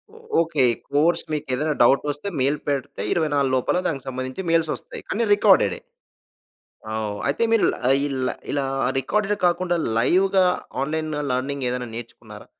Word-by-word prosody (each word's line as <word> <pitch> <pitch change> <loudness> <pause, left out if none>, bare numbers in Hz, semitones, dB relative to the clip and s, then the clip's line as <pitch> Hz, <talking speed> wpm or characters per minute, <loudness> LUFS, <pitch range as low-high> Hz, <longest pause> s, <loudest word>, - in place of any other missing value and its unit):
ఓ - - -13 0.2
okay. 160 -5 +1 0.3
Course 165 +4 +3
మీకేదైనా 150 0 -1
డౌటొస్తే 145 +7 +2
mail 140 +3 +2
పెడితే 140 -7 -2
24 145 -5 +1
లోపల 130 +7 +1
దానికి 135 -4 -4
సంబంధించి 130 +4 -4
మెయిల్స్ 165 -1 +2
వస్తాయి - - -10
అన్నీ 230 +3 +1
రికార్డెడే. - - +4 1.1
అవ్ 110 -1 -2
అయితే, 140 - -1
మీరు 225 - +4 0.4
ఇల్ 135 -2 -3 0.3
ఇలా 140 -1 0 0.3
రికార్డెడ్ 210 - 0
కాకుండా 175 0 +1 0.2
లైవ్‌గా 190 +8 +3 0.4
ఆన్‌లైన్ 155 +2 -2 0.2
లెర్నింగ్ 135 +2 -2
ఏదైనా 125 -1 -3
నేర్చుకున్నారా? 115 0 -10
145 Hz, 130 wpm, -23 LUFS, 130-170 Hz, 1.1 s, రికార్డెడే